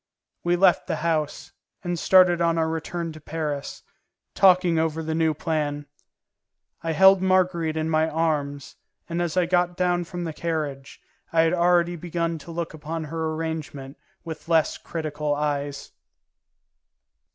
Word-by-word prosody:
We 175 0 +2
left 190 +2 +3
the 170 - -1
house, 155 -3 -1 0.3
and 175 -2 -2
started 180 -1 +5
on 165 -1 +2
our 160 -1 +1
return 165 +1 -3
to 155 0 -12
Paris, 150 -2 -4 0.5
talking 180 -3 +4
over 160 0 -1
the 160 0 -2
new 160 -1 +1
plan. 150 -2 -2 1.0
I 165 -1 -2
held 190 +2 +6
Marguerite 180 -4 +1
in 155 0 -1
my 160 0 +2
arms, 145 -3 -2 0.3
and 170 +1 -2
as 175 0 -2
I 180 - +4
got 175 0 +1
down 175 -1 +1
from 175 0 -6
the 165 -2 -4
carriage, 150 -5 -4 0.3
I 165 - +4
had 165 +1 +2
already 175 0 +2
begun 170 0 -2
to 170 - -10
look 165 0 -4
upon 160 +1 -5
her 160 +1 -3
arrangement 155 -4 -5 0.3
with 160 0 -8
less 160 -2 +3
critical 150 -2 -3
eyes. 145 -1 -3
165 Hz, 150 wpm, -24 LUFS, 155-175 Hz, 1.0 s, held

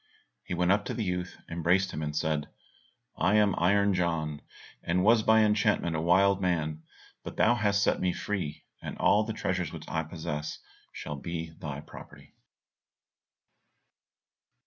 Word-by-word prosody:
He 90 - -4
went 90 +1 +2
up 100 +1 +3
to - - -3
the 115 - -2
youth, 90 -2 -3
embraced 90 +3 +1
him 80 - -5
and 75 -1 -3
said, 75 -2 -1 0.7
"I 105 - +2
am 105 -2 +4
Iron 100 +3 +3
John, 80 -4 -1 0.4
and 90 +2 0
was 110 +2 +5
by 110 +1 +5
enchantment 105 -5 +2
a 80 - -1
wild 95 +3 +4
man, 80 -4 -1 0.4
but - - -8
thou 110 - +5
hast 105 -3 +1
set - - +1
me 90 -1 +2
free; 90 -7 -4 0.3
all 105 - +4
the 110 - -3
treasures 90 -6 -2
which 80 -2 -9
I 80 - -1
possess, 75 -2 -5 0.3
shall 75 - -6
be 80 +2 -5
thy 75 -3 -7
property." - - -13
90 Hz, 150 wpm, -29 LUFS, 80-100 Hz, 0.7 s, was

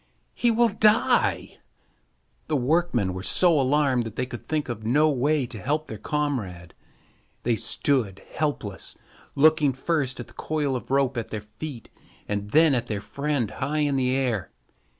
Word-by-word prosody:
He 240 - +2
will 235 +1 +4
die!" 215 +2 +2 0.9
The 155 - 0
workmen 130 - +1
were 95 - -5
so 165 - +3
alarmed 135 -2 +2
that 115 -1 -7
they 125 - -1
could 120 -2 -8
think 155 -2 -2
of 115 -3 -5
no 150 +7 +3
way 145 +1 +1
to 115 -4 -8
help 150 +6 -1
their 110 -7 -8
comrade. 110 - -3 0.7
They 120 -1 +2
stood 110 -5 -1
helpless, 125 -10 -3 0.4
looking 150 -1 +4
first 135 -1 -1
at 120 - -5
the - - -19
coil 150 -4 -2
of 125 - -6
rope 135 -1 +1
at 115 - -2
their 110 - -4
feet 115 +4 -9 0.4
and 105 0 -3
then 155 +4 +5
at 120 -3 -1
their 105 -2 -2
friend 140 -1 -2
high 145 +3 -2
in 140 -1 0
the 130 -1 +1
air. 125 -7 -1
135 Hz, 165 wpm, -25 LUFS, 115-150 Hz, 0.9 s, then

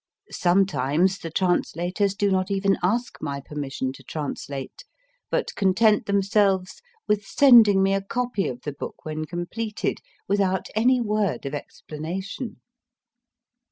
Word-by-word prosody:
Sometimes 180 -1 +2
the 165 - -6
translators 180 +2 0
do 205 -1 +1
not 185 0 +1
even 195 0 +2
ask 230 +7 0
my 140 -1 -3
permission 135 -2 -4
to - - -14
translate, 140 - -6 0.5
but - - -1
content 210 +2 +3
themselves 200 -2 +1 0.3
with 210 -1 +1
sending 220 -6 +6
me 195 0 +2
a 195 - +1
copy 240 0 -2
of 125 -1 -5
the 150 - -4
book 140 - -8
when 155 0 -3
completed, 195 +7 -3 0.3
without 190 -2 0
any 250 +4 +4
word 210 -8 -1
of 140 - -4
explanation. 175 - -6
190 Hz, 125 wpm, -24 LUFS, 160-210 Hz, 0.5 s, sending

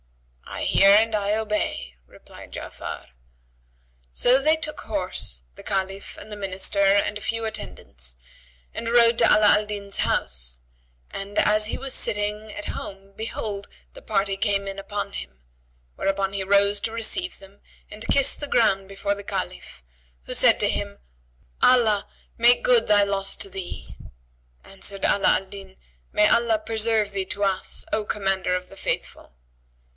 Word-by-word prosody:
"I - - -6
hear 195 - +5
and 220 +2 +5
I 205 0 0
obey," 210 - -2
replied - - -15
Ja'afar. - - -7 1.0
So 255 +2 +4
they 310 +3 +4
took 305 -1 -4
horse, 185 - -3
the - - -12
Caliph 195 0 -3
and 215 - -11
the - - -5
Minister 195 0 0
and 200 +1 +3
a - - -12
few 230 +1 -2
attendants, - - -5 0.6
and 230 - -3
rode 235 -1 +5
to - - +5
Ala 210 -1 +6
al 210 - -2
Din's 200 -1 -4
house - - -1 0.5
and, 200 +1 -6
as 210 0 +3
he - - -3
was 270 -1 -5
sitting 210 +1 -2
at 205 - -6
home, 195 0 -7
behold, 210 -2 -4 0.3
the - - -12
party 200 -2 0
came 200 -1 0
in 195 0 -5
upon 205 +1 -5
him; 60 +1 -8 0.5
whereupon 195 0 -1
he 195 -1 -2
rose 200 +1 +3
to 220 - -2
receive 230 +11 -1
them 195 +1 -17 0.3
and 210 +2 -8
kissed 275 -1 +3
the 290 - -2
ground 195 -7 +2
before 200 +1 -2
the 200 - -9
Caliph, 65 - -5 0.4
who - - -4
said - - +5
to - - +2
him, - - -3 0.6
"Allah 225 -5 +4 0.3
make 240 +1 +5
good 240 -2 +4
thy 205 -1 +5
loss 195 -1 -1
to - - -4
thee!" 190 -2 -7 0.7
Answered 195 0 -2
Ala 200 - +4
Al 195 - -13
Din, 190 -1 -11 0.4
"May 210 - +4
Allah 235 -1 +3
preserve 220 -1 0
thee 195 -1 -2
to 205 +2 -2
us, 195 -1 -1
O 215 - +1
Commander 195 -3 0
of 180 0 -5
the 195 - -14
Faithful!" - - -4
205 Hz, 160 wpm, -24 LUFS, 195-220 Hz, 1.0 s, Ala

